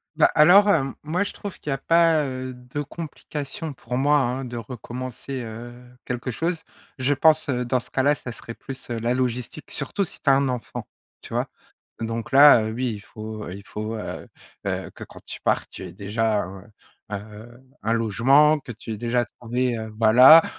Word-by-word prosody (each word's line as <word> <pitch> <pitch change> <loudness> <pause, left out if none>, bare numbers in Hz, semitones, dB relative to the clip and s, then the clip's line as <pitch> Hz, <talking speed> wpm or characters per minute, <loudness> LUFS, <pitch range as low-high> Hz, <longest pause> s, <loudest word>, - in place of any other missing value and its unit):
Bah, 155 - +5
alors, 180 +7 +7
hem, 135 -8 +2
moi 165 +6 0
je 205 - -4
trouve 200 -3 -8
qu'il - - -6
y - - +2
a - - -1
pas, 165 +2 +4
heu, 130 -1 -5
de 125 +4 -6
complications, 150 0 -6
pour 125 -1 -5
moi 145 +3 +4
hein, 130 -1 0
de 120 -1 -6
recommencer, 125 +3 -6
heu, 115 +1 -8 0.3
quelque 125 +1 -3
chose. 165 +8 -1 0.4
Je 130 +2 +2
pense, 155 +1 +3
heu, 125 -2 0
dans 125 +1 +1
ce - - -14
cas-là, 140 +2 +3
ça 125 - -7
serait 115 0 -9
plus, 135 -2 -9
heu, 120 - -2
la 115 +2 0
logistique, 125 +3 -2
surtout 150 +8 -2
si - - -9
tu 145 - +3
as - - +7
un 135 0 +3
enfant, 125 -3 -5 0.3
tu - - -10
vois? - - 0 0.5
Donc 115 +4 -4
là, 140 -3 +9
heu, 110 - -3
oui, 125 +1 -1
il 105 - -7
faut, 110 0 -8
heu, 90 - -6
il 100 - -10
faut, 110 +1 -5
heu, 110 - -6 0.4
heu, - - -3
que - - -10
quand - - -12
tu - - -8
pars, - - +1
tu - - -10
aies - - -8
déjà 105 +2 0
un, 95 +1 -9 0.8
heu, 120 +2 -14 0.2
un 110 +2 0
logement, 130 +8 +4
que 130 - -9
tu 115 0 -8
aies 110 - -4
déjà 120 +2 0
trouvé, 120 +1 -2
heu, 110 0 -6
voilà, 125 +9 +9
125 Hz, 205 wpm, -24 LUFS, 115-145 Hz, 0.8 s, là